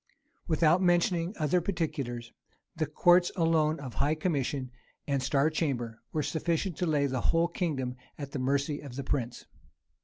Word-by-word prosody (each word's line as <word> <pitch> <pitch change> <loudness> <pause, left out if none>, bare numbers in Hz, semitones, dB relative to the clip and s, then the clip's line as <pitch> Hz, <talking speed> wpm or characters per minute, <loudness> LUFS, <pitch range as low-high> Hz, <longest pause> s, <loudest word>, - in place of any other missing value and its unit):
Without 165 +2 +4
mentioning 175 +1 +2
other 160 +3 +2
particulars, 135 -10 -3 0.4
the 160 -2 -1
courts 175 +4 +4
alone 160 -3 +2
of 130 -4 -7
high 145 +7 +1
commission 140 -5 -1 0.3
and 140 -2 0
star 140 +3 +2
chamber 125 -8 -2
were 155 - -1
sufficient 170 +3 -1
to 180 - 0
lay 150 -3 +2
the 130 -3 -1
whole 165 +5 +3
kingdom 145 -8 -2 0.2
at 140 -2 -6
the 140 - -3
mercy 140 +3 0
of 140 -4 -9
the 140 - -4
prince. 120 -3 -2
150 Hz, 155 wpm, -30 LUFS, 135-170 Hz, 0.4 s, Without